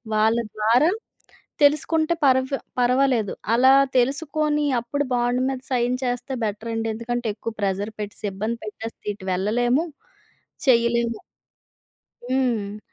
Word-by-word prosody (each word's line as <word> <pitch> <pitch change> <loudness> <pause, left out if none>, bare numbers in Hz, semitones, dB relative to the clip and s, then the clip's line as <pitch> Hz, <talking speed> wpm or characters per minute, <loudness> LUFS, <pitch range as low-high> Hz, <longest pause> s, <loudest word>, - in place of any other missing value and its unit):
వాళ్ళ 220 +2 +3 0.2
ద్వారా 235 +9 +4 0.7
తెలుసుకుంటే 310 +3 +3
పర్ 260 -1 +5 0.4
పర్వాలేదు. 250 -3 +2 0.2
అలా 260 +3 +6 0.2
తెలుసుకొని 295 +3 +1
అప్పుడు 260 +5 -2
బాండ్ 245 +1 +1
మీద 265 -1 -3
సైన్ 245 0 +1
చేస్తే 245 +1 -2
బెటర్ 220 +2 -3
అండి. 225 0 -2
ఎందుకంటే 240 +1 -3
ఎక్కువ 230 +1 -5
ప్రెషర్ 200 +2 -1
పెట్టేసి 205 0 -6
ఇబ్బంది 220 +4 -3
పెట్టేసి 225 +2 -7 0.2
ఇటు 195 -2 -12
వెళ్ళలేము. 240 - +1 0.8
చేయలేము. 235 -2 +3 1.1
హ్మ్. 235 -6 -1
240 Hz, 110 wpm, -23 LUFS, 220-265 Hz, 1.1 s, అలా